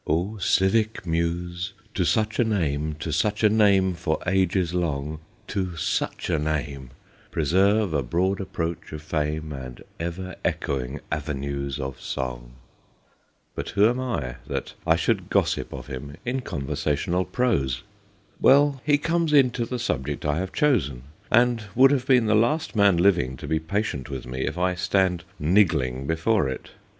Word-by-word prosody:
* - - -24
O 90 +8 0
civic 100 +3 +2
muse, 85 +1 -2 0.2
to 95 - +1
such 110 +3 +1
a - - +6
name, 80 -8 -1
To 75 +2 -5
such 105 +7 0
a 105 - +7
name 100 -4 +4
for 80 -2 -1
ages 95 -2 +1
long, 75 -3 -2 0.3
To 95 -3 -2
such 80 - -2
a 80 - +1
name, 75 -4 -3 0.4
Preserve 95 +5 +2
a 70 - +2
broad 90 +10 0
approach 85 -3 -4
of 75 -1 -6
fame, 75 0 -2
And 65 -2 -8 0.2
ever 90 +3 -5
echoing 65 +1 -2
avenues 70 -2 -3
of 65 -1 -5
song.' - - -4 1.0
But - - -5
who 100 +2 +4
am 120 +2 0
I 90 - -3
that - - -4
I - - +5
should - - 0
gossip - - +1
of - - -7
him 70 +1 -7
in 125 +2 -1
conversational 75 - -1
prose? 70 - 0 0.6
Well, 140 0 +5
he 145 -1 +4
comes 165 +1 0
into 125 -4 +4
the 125 - -3
subject 75 - -2
I 75 +1 +1
have 95 0 -3
chosen, 85 - +1 0.3
and 120 -1 +3
would 135 +3 +7
have 135 -3 0
been 125 -4 +5
the 110 - +3
last 120 +7 +1
man 100 -4 +5
living 85 -8 +2
to - - -8
be 80 - +1
patient 80 - -2
with 65 -2 -5
me 65 +1 -3
if - - -3
I 90 +1 +1
stand 90 -1 +1
niggling 75 -7 +2
before 80 0 +1
it. 65 - -6
85 Hz, 160 wpm, -25 LUFS, 75-105 Hz, 1.0 s, a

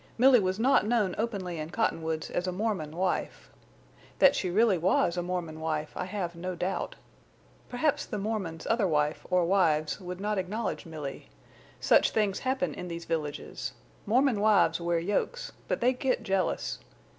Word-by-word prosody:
Milly 255 +1 +7
was 185 -1 0
not 240 -2 +3
known 215 -6 +2
openly 195 -7 -2
in 155 +1 -4
Cottonwoods 160 -6 -1
as 180 - -1
a - - 0
Mormon 185 -6 -2
wife. 185 +1 -2 0.7
That 280 0 +6
she 185 - -1
really 200 0 +3
was 175 0 +2
a 175 - -1
Mormon 175 -3 -4
wife 155 -1 -2
I - - -3
have 185 -3 -4
no 180 +2 -4
doubt. 190 - -2 0.7
Perhaps 290 +4 0
the - - -4
Mormon's 195 -6 -3
other 225 -4 +2
wife 150 -2 0
or 180 -1 +3
wives 165 -4 +2
would 180 0 -6
not 210 0 -1
acknowledge 200 0 -3
Milly. 150 -4 -7 0.5
Such - - +4
things 210 -3 0
happen 255 - -1
in 180 - -6
these 170 -1 -6
villages. 155 -3 -4 0.3
Mormon 250 0 +3
wives 200 -6 +4
wear 170 0 +1
yokes, 205 - -1 0.2
but - - -1
they 250 +2 +4
get 255 -2 -1
jealous. 195 -3 -1
185 Hz, 165 wpm, -29 LUFS, 170-220 Hz, 0.7 s, Milly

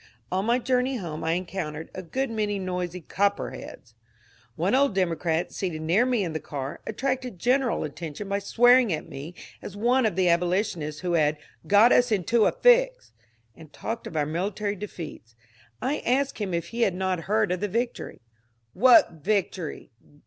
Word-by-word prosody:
On 190 +2 0
my 235 +2 +3
journey 255 +1 0
home 165 -6 -6
I 160 - +1
encountered 170 -3 -4
a 185 - -6
good 255 +8 -3
many 210 -2 -1
noisy 180 -1 -4
*^ - - -31
Copperheads." 200 +1 -2 0.6
One - - 0
old 270 -5 +3
Democrat, 170 -2 0
seated 165 -5 -3
near 190 +10 +3
me 245 -5 +1
in 165 -3 -3
the 155 - -2
car, 140 -3 -6
attracted 255 -1 -2
general 250 +4 +1
attention 155 +5 -6
by 200 0 -1
swearing 245 +3 +4
at 155 - -3
me 145 +6 -8 0.3
as 205 - -8
one 240 +2 +3
of 210 - -3
the 185 -1 +2
abolitionists 175 -3 0
who 180 -1 -1
had 155 -2 +3
^^ - - -28 0.3
got 210 +4 +6
us 245 -1 +4
into 215 +3 +1
this - - +2
fix," - - +4 0.4
and 155 -2 -14
talked 230 +1 -5
of 160 - -6
our 150 - +2
military 200 +6 -2
defeats. 165 - -8 0.5
I 280 +3 0
asked 270 +1 0
him 200 -3 -2
if 170 0 -3
he 235 +1 -4
had 195 -5 +2
not 185 -2 -2
heard 215 -2 +2
of 180 - -1
the 205 - -1
victory. 235 +5 -3 0.5
"What 245 +1 +6
victory? 190 -7 -2
195 Hz, 180 wpm, -26 LUFS, 170-235 Hz, 0.6 s, got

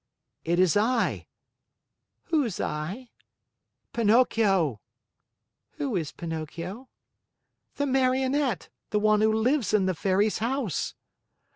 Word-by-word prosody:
"It 170 +1 0
is 185 -3 +4
I." 230 +3 +1 1.0
"Who's 285 - 0
I?" 180 +12 -4 0.8
"Pinocchio." 205 - +3 0.9
"Who 280 -7 -3
is 160 -5 -2
Pinocchio?" 170 - -6 0.9
"The 285 - 0
Marionette; 265 -2 +1 0.2
the 210 - 0
one 215 0 +3
who 220 0 +4
lives 220 +1 +1
in 195 -3 +3
the 185 - +1
Fairy's 195 +5 +1
house." 235 - -2
215 Hz, 100 wpm, -27 LUFS, 185-255 Hz, 1.0 s, is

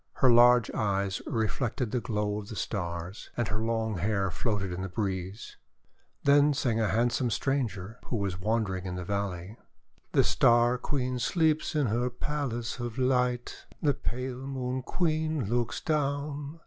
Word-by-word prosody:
Her 130 - +4
large 120 0 +6
eyes 100 -2 0
reflected 115 -1 -1
the 125 - +1
glow 105 -2 -1
of 105 0 -9
the 110 - -6
Stars, 90 -2 -4
and 120 -2 +1
her 105 - -1
long 110 -2 -1
hair 100 0 0
floated 100 -2 -1
on 90 - -4
the 95 - -3
breeze. 95 +1 -4 0.7
Then 145 +1 +5
sang 120 -4 +1
a 110 - +2
handsome 120 +3 +1
stranger 115 -5 -2
who - - -3
was 100 -4 -2
wandering 95 -3 -1
in 90 - -3
the 90 - -4
valley: 100 0 -3 0.2
" - - -39
The - - +5
Star 120 +1 +4
Queen 130 -3 -1
sleeps 155 +3 +1
in 150 -2 +3
her 120 +2 +1
palace 125 -2 -3
of 120 0 -4
light. 125 -1 0
The 145 -2 +2
pale 130 0 -4
Moon 130 -1 -2
Queen 155 - 0
looks 120 +3 0
down. 145 0 -2
120 Hz, 160 wpm, -29 LUFS, 105-130 Hz, 0.7 s, large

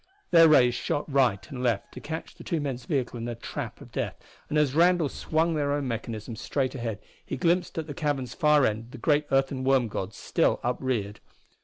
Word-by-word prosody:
Their 165 -1 +8
rays 125 -6 +6
shot 145 +4 -2
right 125 -8 +2
and 130 -2 -5
left 120 -5 0
to - - -8
catch 160 +2 -6
the - - -13
two 165 - -1
men's 130 -4 -4
vehicle 125 -4 -1
in 115 - -4
a 120 - -3
trap 115 - -6
of - - -12
death, - - -2 0.3
and 150 - 0
as 150 -3 +3
Randall 170 -1 +4
swung 160 +4 0
their 145 -2 0
own 145 -2 -1
mechanism 115 -1 -4
straight 130 +4 -1
ahead 115 -5 -3 0.3
he - - -5
glimpsed 175 0 +1
at 160 - -2
the 145 - -6
cavern's 135 -4 -2
far 150 -2 +4
end 110 +3 -2
the - - -7
great 145 +4 +2
earthen 135 -1 +1
worm 130 -2 +3
god 100 0 -4
still - - +1
upreared. 120 -5 -1
135 Hz, 205 wpm, -27 LUFS, 120-150 Hz, 0.3 s, Their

